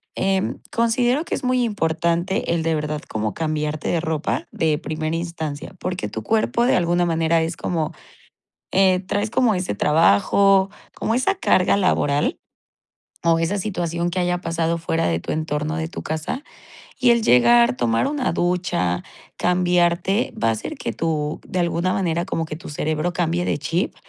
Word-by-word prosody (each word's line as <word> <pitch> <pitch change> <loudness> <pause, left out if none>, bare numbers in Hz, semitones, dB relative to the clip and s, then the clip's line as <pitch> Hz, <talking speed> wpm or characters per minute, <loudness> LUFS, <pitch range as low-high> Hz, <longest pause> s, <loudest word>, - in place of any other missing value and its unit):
eh, 190 0 0 0.2
considero 240 +5 +1
que - - -2
es - - -6
muy 255 0 +2
importante 170 -3 0
el 165 -1 0
de 165 0 +1
verdad 150 0 -3
como 110 -1 -2
cambiarte 155 -1 -2
de 170 - +1
ropa 160 -1 -2
de 155 -2 +1
primera 155 -1 -3
instancia, 165 -1 -5
porque 185 0 -3
tu - - -6
cuerpo 225 +2 +1
de 255 - +3
alguna 175 0 +2
manera 165 -1 +2
es 165 +1 -3
como, 160 -4 -2 0.8
eh, 190 -1 +4
traes 205 +3 -2
como 240 -3 +3
ese 180 - -2
trabajo, 165 - +4 0.3
como 225 - -1
esa 325 +11 +1
carga 190 - +3
laboral, 150 -7 +1 0.9
o 165 -1 +4
esa 165 +5 0
situación 175 -4 -2
que 180 - -3
haya 180 0 0
pasado 165 0 -1
fuera 165 0 -1
de 85 -1 0
tu - - -6
entorno, 155 0 -2
de 160 -1 -2
tu 170 - -7
casa 160 - -3 0.6
y 255 -2 +4
el 235 -1 +4
llegar, 120 - +5
tomar 115 -2 +1
una 285 -2 -1
ducha, 175 - 0 0.4
cambiarte, 180 +3 +2
va 115 - +3
a - - +3
hacer 110 - -4
que 115 - -4
tu 150 +3 -2
de 185 - -5
alguna 175 +1 +1
manera, 175 -3 0
como 165 -4 -2
que 155 - -6
tu 165 - -10
cerebro 155 +3 -1
cambie 175 0 0
de - - 0
chip, 165 +5 -2
170 Hz, 170 wpm, -22 LUFS, 155-190 Hz, 0.9 s, llegar